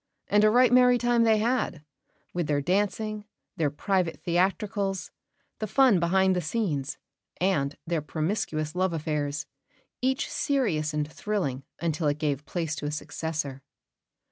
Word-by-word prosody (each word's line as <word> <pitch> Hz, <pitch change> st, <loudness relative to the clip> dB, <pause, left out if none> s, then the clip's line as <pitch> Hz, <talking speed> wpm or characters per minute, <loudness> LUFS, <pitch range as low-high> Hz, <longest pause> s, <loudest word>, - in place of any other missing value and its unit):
And 205 Hz, 0 st, +4 dB
a 215 Hz, -, +7 dB
right 245 Hz, +2 st, +5 dB
merry 250 Hz, 0 st, +6 dB
time 240 Hz, -1 st, +3 dB
they 220 Hz, -1 st, +5 dB
had, 220 Hz, -8 st, 0 dB, 0.5 s
with 175 Hz, -3 st, -1 dB
their 145 Hz, -1 st, +1 dB
dancing, 205 Hz, +6 st, -1 dB, 0.3 s
their 155 Hz, -3 st, +1 dB
private 180 Hz, +3 st, -1 dB
theatricals, 195 Hz, +1 st, 0 dB, 0.5 s
the 215 Hz, -, -2 dB
fun 250 Hz, -4 st, +5 dB
behind 190 Hz, +2 st, +3 dB
the 180 Hz, -, 0 dB
scenes, 155 Hz, -, -2 dB, 0.4 s
and 150 Hz, -7 st, +1 dB
their 165 Hz, -2 st, -1 dB
promiscuous 155 Hz, -1 st, -2 dB
love 185 Hz, 0 st, 0 dB
affairs, 150 Hz, -2 st, -2 dB, 0.6 s
each 265 Hz, +1 st, +1 dB
serious 200 Hz, -, 0 dB
and 150 Hz, -1 st, -1 dB
thrilling 155 Hz, -7 st, -3 dB
until 160 Hz, -1 st, 0 dB
it 145 Hz, 0 st, +1 dB
gave 145 Hz, -1 st, -2 dB
place 165 Hz, -3 st, -2 dB
to 145 Hz, -, -3 dB
a -, -, -2 dB
successor. 150 Hz, -3 st, -4 dB
175 Hz, 140 wpm, -27 LUFS, 150-210 Hz, 0.6 s, a